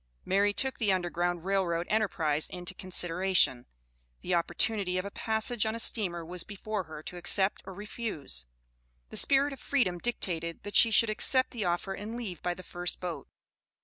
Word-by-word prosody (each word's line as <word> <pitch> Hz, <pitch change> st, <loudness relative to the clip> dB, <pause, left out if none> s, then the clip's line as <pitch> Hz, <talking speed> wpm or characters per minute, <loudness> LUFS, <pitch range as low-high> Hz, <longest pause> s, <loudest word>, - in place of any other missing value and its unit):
Mary 200 Hz, +2 st, +3 dB
took 265 Hz, +5 st, 0 dB
the 210 Hz, -4 st, +2 dB
Underground 175 Hz, -1 st, -1 dB
Rail 195 Hz, 0 st, +2 dB
Road 170 Hz, -1 st, -1 dB
enterprise 165 Hz, -8 st, +1 dB
into 180 Hz, +1 st, -6 dB
consideration. 180 Hz, -7 st, +2 dB, 0.5 s
The 185 Hz, -, -2 dB
opportunity 180 Hz, +2 st, +1 dB
of 185 Hz, -, -2 dB
a 200 Hz, -, -5 dB
passage 220 Hz, +1 st, +1 dB
on 220 Hz, 0 st, -1 dB
a -, -, -5 dB
steamer 175 Hz, -8 st, 0 dB
was 180 Hz, +1 st, -4 dB
before 210 Hz, -1 st, -4 dB
her 155 Hz, -1 st, -9 dB
to 180 Hz, -, -7 dB
accept 190 Hz, +3 st, +1 dB
or 190 Hz, -, -7 dB
refuse. 200 Hz, -, -4 dB, 0.6 s
The -, -, -4 dB
spirit 280 Hz, +1 st, +4 dB
of 270 Hz, -, -10 dB
freedom 190 Hz, -11 st, 0 dB
dictated 170 Hz, -7 st, -2 dB
that 205 Hz, -, -7 dB
she 230 Hz, -, +7 dB
should 220 Hz, +1 st, +5 dB
accept 255 Hz, +4 st, +3 dB
the 225 Hz, -5 st, -3 dB
offer 175 Hz, +2 st, -1 dB
and 215 Hz, +4 st, -6 dB
leave 195 Hz, -9 st, -6 dB
by 175 Hz, 0 st, -1 dB
the 185 Hz, -, -10 dB
first 175 Hz, 0 st, -2 dB
boat. 170 Hz, -6 st, -5 dB
190 Hz, 180 wpm, -30 LUFS, 175-215 Hz, 0.6 s, she